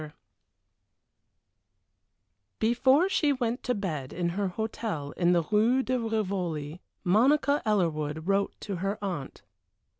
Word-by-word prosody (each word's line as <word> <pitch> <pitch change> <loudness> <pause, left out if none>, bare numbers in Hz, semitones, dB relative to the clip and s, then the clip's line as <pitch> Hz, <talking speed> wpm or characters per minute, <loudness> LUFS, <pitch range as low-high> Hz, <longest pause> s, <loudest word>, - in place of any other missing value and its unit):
VI 150 -1 -9 2.4
Before 260 +9 +3
she 310 -6 +2
went 245 -2 -1
to 250 - -1
bed 155 -10 -4
in 175 -1 -1
her 195 +3 -1
hotel 195 -6 -4
in 175 -1 +1
the 170 -1 +3
Rue 225 +8 +2
de 255 0 0
Rivoli, 185 -8 -2 0.2
Monica 275 +9 +3
Ellerwood 160 -7 0
wrote 200 0 0
to 200 -3 -4
her 195 +3 -2
aunt. 175 -9 -5
200 Hz, 120 wpm, -28 LUFS, 170-235 Hz, 2.4 s, Before